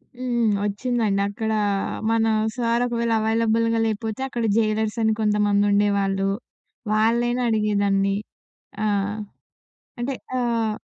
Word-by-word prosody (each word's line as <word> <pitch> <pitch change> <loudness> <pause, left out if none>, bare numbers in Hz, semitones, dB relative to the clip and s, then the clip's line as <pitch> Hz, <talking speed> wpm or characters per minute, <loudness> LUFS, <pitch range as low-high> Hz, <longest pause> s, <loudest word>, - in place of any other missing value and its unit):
హ్మ్. 240 -3 0
ఒచ్చిండి 210 -1 0
అక్కడ 220 +2 -3 0.6
మన 225 0 +2 0.3
సార్ 235 0 +1
ఒకవేళ 235 -1 -1
అవైలబుల్‌గా 230 +1 +1
లేపోతే 220 +2 -3
అక్కడ 240 -3 -3
జైలర్స్ 215 0 0
అని 220 0 +3
కొంతమందుండేవాళ్ళు. 205 -2 +2 0.7
వాళ్ళనైనా 235 +3 +2
అడిగేదాన్ని. 200 -2 +1 0.7
ఆ! - - +1 1.1
అంటే 250 +3 -2 0.3
ఆహ్ 230 -3 0
220 Hz, 95 wpm, -23 LUFS, 205-235 Hz, 1.1 s, అని